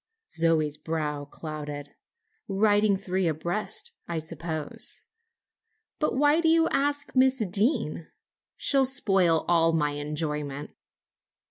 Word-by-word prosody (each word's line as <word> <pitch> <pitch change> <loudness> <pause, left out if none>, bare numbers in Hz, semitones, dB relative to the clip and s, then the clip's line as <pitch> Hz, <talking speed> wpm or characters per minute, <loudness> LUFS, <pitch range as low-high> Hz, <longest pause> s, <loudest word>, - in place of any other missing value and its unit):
Zoe's 160 -3 +1
brow 150 -2 -3
clouded. 145 -1 -7 0.5
"Riding 205 0 +3
three 190 -1 -1
abreast, 175 - -1 0.2
I 170 - -3
suppose. 160 -1 -4 0.9
But 305 -4 0
why 295 +3 +4
did 325 - +3
you 325 0 +4
ask 285 +1 0
Miss 260 -3 +4
Deane? 195 - +1 0.5
She'll 275 -1 +2
spoil 195 -11 +2
all 165 -1 +3
my 150 -2 +1
enjoyment." 150 -1 -3
170 Hz, 105 wpm, -27 LUFS, 150-220 Hz, 0.9 s, why